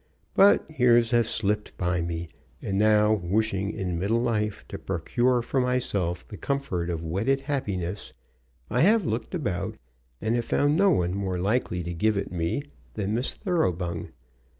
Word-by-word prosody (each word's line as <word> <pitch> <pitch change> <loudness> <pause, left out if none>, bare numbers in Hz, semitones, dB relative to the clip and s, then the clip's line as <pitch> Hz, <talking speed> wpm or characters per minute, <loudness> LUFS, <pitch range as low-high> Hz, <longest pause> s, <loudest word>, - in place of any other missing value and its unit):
But 200 +1 +5
years 120 -1 +5
have 120 -2 +3
slipped 105 0 -1
by 90 -1 0
me, 85 0 -3 0.3
and 95 - -3
now 105 0 +4
wishing 100 +1 0
in 95 -5 -3
middle 105 +6 +1
life 110 -3 -1
to - - -6
procure 120 +8 0
for 130 +2 0
myself 100 -9 -1
the 105 - -9
comfort 115 -12 -2
of 85 -1 -3
wedded 110 +12 0
happiness, 100 - -3 0.6
I 125 - +1
have 210 +3 +4
looked 115 - -2
about, 105 - -2 0.4
and 110 +1 0
have 120 -1 0
found 145 +4 +2
no 195 +4 +4
one 90 - +1
more 95 -2 -2
likely 95 -2 0
to 85 +1 -4
give 105 +4 +1
it 100 - -3
me, 85 +10 -1 0.3
than 105 -1 -2
Miss 120 +3 -1
Thoroughbung. 90 - -1
105 Hz, 160 wpm, -26 LUFS, 90-125 Hz, 0.6 s, But